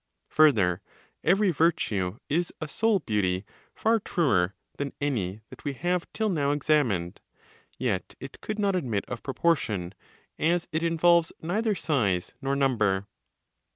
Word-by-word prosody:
Further, 105 - +4 0.4
every 195 +3 +4
virtue 115 - +1
is 170 +4 0
a 155 - -4
soul 220 +8 +2
beauty 100 - -1 0.3
far 225 +1 +2
truer 100 - +1 0.2
than 140 -1 -3
any 110 -9 -2
that - - -12
we 145 - -2
have 175 +4 -1
till 220 0 -1
now 150 -8 +1
examined; 130 - +1 0.6
yet - - -2
it - - -10
could 215 - -4
not 200 -2 +1
admit 120 - -1
of 120 - -5
proportion, 115 - 0 0.5
as 170 +2 +1
it 160 0 0
involves 170 0 +3
neither 210 +6 0
size 110 - 0
nor 135 0 0
number. 110 -8 +1
145 Hz, 135 wpm, -27 LUFS, 105-170 Hz, 0.6 s, Further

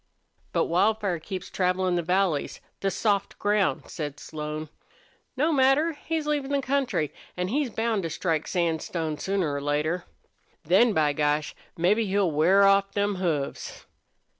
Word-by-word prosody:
"But - - +1
Wildfire 200 0 +1
keeps 185 +3 -7
travelin' 185 0 +1
the 175 - +1
valleys 180 -3 0 0.2
the 195 - 0
soft 200 +1 0
ground," 205 -1 +1
said 145 -3 -5
Slone. 155 0 -6 0.7
"No 310 +4 +2
matter. 275 +4 +4
He's 315 +1 -3
leavin' 295 -2 -1
the 280 - +2
country, 265 - -1 0.2
an' 180 +1 -1
he's 280 +3 0
bound 225 -1 -1
to 165 - -3
strike 160 -1 -1
sandstone 165 -2 -1
sooner 190 -5 -1
or 140 - -3
later. 150 +5 -1 0.6
Then, 195 +8 +4
by 150 -4 +2
gosh! 150 +1 0 0.2
mebbe 180 +6 +3
he'll 200 -4 +1
wear 175 +7 +4
off 195 0 +4
them 205 -1 0
hoofs." 160 -7 -3
185 Hz, 145 wpm, -26 LUFS, 160-210 Hz, 0.7 s, matter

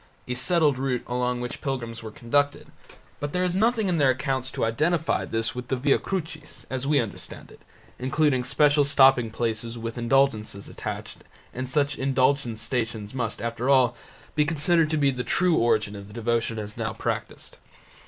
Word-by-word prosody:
a 125 - -1
settled 145 +1 +2
route 130 -2 -1
along 125 0 -1
which 125 0 -5
pilgrims 120 -5 -4
were 110 - -7
conducted, 145 +2 0 0.5
but 145 0 -4
there 180 - +1
is 180 -1 0
nothing 220 +1 +2
in 180 -2 +1
their 140 -2 +5
accounts 130 0 -1
to - - -1
identify 155 +8 +1
this 115 0 -1
with 125 0 -6
the 130 - 0
Via 135 +2 +2
Crucis, 160 -5 -5
as 130 +1 -2
we 145 -1 +4
understand 115 -5 -5
it, - - -17 0.4
including 130 0 +1
special 145 +3 +4
stopping 135 -4 +5
places 115 +1 -3
with 115 +1 -5
indulgences 120 -5 +1
attached, - - -6 0.3
and 130 0 -4
such 145 +1 +1
indulgenced 130 -3 +1
Stations 115 -3 -3
must, 115 -4 -3
after 115 +2 -2
all, 130 -3 +4 0.4
be 150 - +3
considered 160 +1 +2
to 155 - 0
be 140 -2 +3
the 125 -1 -4
true 175 +8 +2
origin 110 -3 +2
of 100 -1 -9
the 105 - -13
devotion 115 -1 0
as 105 0 -6
now - - -2
practised. - - -4
130 Hz, 175 wpm, -25 LUFS, 115-145 Hz, 0.5 s, their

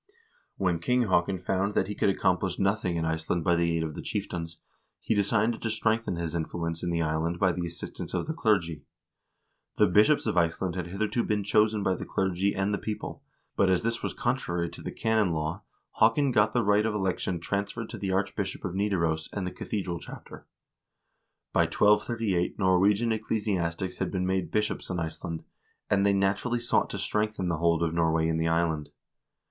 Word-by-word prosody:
When 90 -4 +1
King 125 +8 +2
Haakon 95 -2 +2
found 95 +3 -1
that 95 - +2
he 105 - -3
could 100 - +1
accomplish 90 -1 +1
nothing 95 -3 +1
in 80 - -1
Iceland 80 +1 -1
by 85 0 +3
the 85 -1 +1
aid 80 - 0
of 80 -1 -4
the - - -6
chieftains, 85 -5 -4 0.4
he - - 0
decided 110 +3 +1
to 115 - -1
strengthen 110 -2 0
his 85 -1 -3
influence 85 0 -3
in 90 - -2
the 85 -1 +1
island 80 +2 -1
by 95 -1 +3
the 85 0 -3
assistance 85 - -7
of - - -1
the 160 - -3
clergy. 100 - +1 1.0
The - - +6
bishops 105 +11 +4
of 110 -5 0
Iceland 85 +1 +1
had 90 -1 -4
hitherto 110 +6 -1
been 105 -1 0
chosen 105 +1 +2
by 95 - +2
the - - -5
clergy 95 +1 0
and 95 +1 0
the 100 - -1
people, 105 -1 -5 0.3
but 95 - +3
as 90 -2 +2
this 115 0 -1
was - - -3
contrary 105 -10 -1
to - - -10
the - - -5
canon 110 -6 +1
law, 80 +5 -2 0.4
Haakon 125 +5 +4
got 105 -2 +3
the 120 - +2
right 105 0 +4
of 110 - -1
election 95 -2 -1
transferred 100 +5 -3
to - - -7
the 95 -1 -2
Archbishop 95 0 -2
of 90 - -3
Nidaros 85 -6 0
and 100 -2 -3
the 90 - -3
cathedral 90 -5 -4
chapter. - - -11 1.1
By - - +4
1238 105 -3 +2
Norwegian 100 +4 +3
ecclesiastics 95 -5 -1
had - - 0
been 90 -2 -1
made 95 -3 0
bishops 105 +4 -1
in 90 -2 -2
Iceland, 80 0 -5 0.5
and 100 -1 +4
they 100 0 +4
naturally 100 +5 +1
sought 120 - +1
to - - -4
strengthen 105 -3 -1
the 85 - 0
hold 85 0 +2
of 80 -1 0
Nor 85 -1 +2
way 80 0 +2
in 80 0 0
the 80 0 +1
island. 80 -2 0
95 Hz, 195 wpm, -28 LUFS, 85-105 Hz, 1.1 s, The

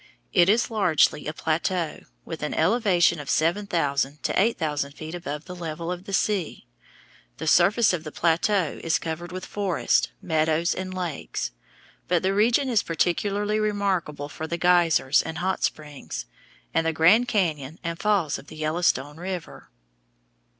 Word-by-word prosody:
It 175 -1 +5
is 230 +3 +2
largely 175 -8 +2
a - - -1
plateau, 165 +2 -1 0.3
with - - -7
an - - -3
elevation 175 -3 +3
of 145 - -7
seven 175 +6 +1
thousand 145 -4 -1
to - - +2
eight 230 +3 +2
thousand 145 -3 -2
feet 155 +2 -8
above 150 -4 -5
the 180 - -8
level 165 0 -5
of 180 +1 -6
the 200 - -7
sea. 195 -3 -1 0.7
The - - -5
surface 195 +7 +4
of 165 -3 -2
the 155 - -7
plateau 170 +1 +1
is 165 - +2
covered 165 +1 -5
with 185 0 -6
forests, 200 -4 +1
meadows, 160 0 +1
and 185 0 -5
lakes; 180 -5 -4 0.6
but 175 -1 +1
the 190 +1 +2
region 235 +7 +3
is 230 -5 +2
particularly 205 +5 0
remarkable 195 -9 -1
for 160 +2 -6
the 170 - -3
geysers 170 -6 +4
and 160 0 -6
hot 190 +1 -1
springs, 150 -2 -4 0.5
and 165 0 +1
the 165 - +1
Grand 190 +10 +5
Cañon 160 - -1
and 170 0 -4
falls 200 -8 +1
of 145 - -15
the - - -11
Yellowstone 155 -2 0
River. 180 - -6
170 Hz, 160 wpm, -25 LUFS, 155-195 Hz, 0.7 s, It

